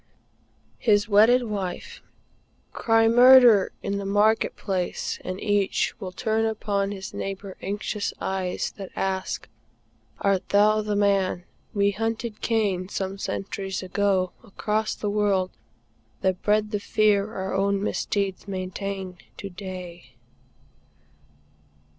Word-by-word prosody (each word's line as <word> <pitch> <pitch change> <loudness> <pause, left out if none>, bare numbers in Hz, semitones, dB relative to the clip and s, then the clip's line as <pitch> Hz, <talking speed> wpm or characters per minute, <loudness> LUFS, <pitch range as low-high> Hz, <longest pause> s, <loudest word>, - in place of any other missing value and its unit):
HIS 205 -3 +3
WEDDED 225 +4 +5
WIFE. 200 -5 -5 0.7
Cry 225 -1 +3
"Murder!" 245 -3 +7
in 200 0 -2
the - - -4
market 205 +3 +2
place, 185 -3 -3
and 185 +1 -5
each 205 -2 +1
Will 190 -4 -6
turn 220 +2 0
upon 205 -2 -1
his 190 -1 -7
neighbor 195 0 -5
anxious 205 +1 -3
eyes 190 -1 -2
That 195 -2 -7
ask: 190 -1 -2 0.7
"Art 195 -2 0
thou 215 +1 +4
the 210 -1 -2
man?" 195 -3 +1 0.3
We 200 0 +3
hunted 225 +1 -3
Cain, 200 -5 0
Some 195 0 -4
centuries 195 -1 -4
ago, 190 -1 +1
across 215 0 -2
the 210 - -4
world, 200 -3 +1 0.7
That 185 -1 0
bred 210 0 +1
the 205 - -1
fear 210 0 +2
our 190 0 -3
own 200 +1 +1
misdeeds 200 -2 -2
maintain 190 -1 -5 0.2
To 195 - -7
day. 180 -7 -9
200 Hz, 115 wpm, -25 LUFS, 190-215 Hz, 0.7 s, Murder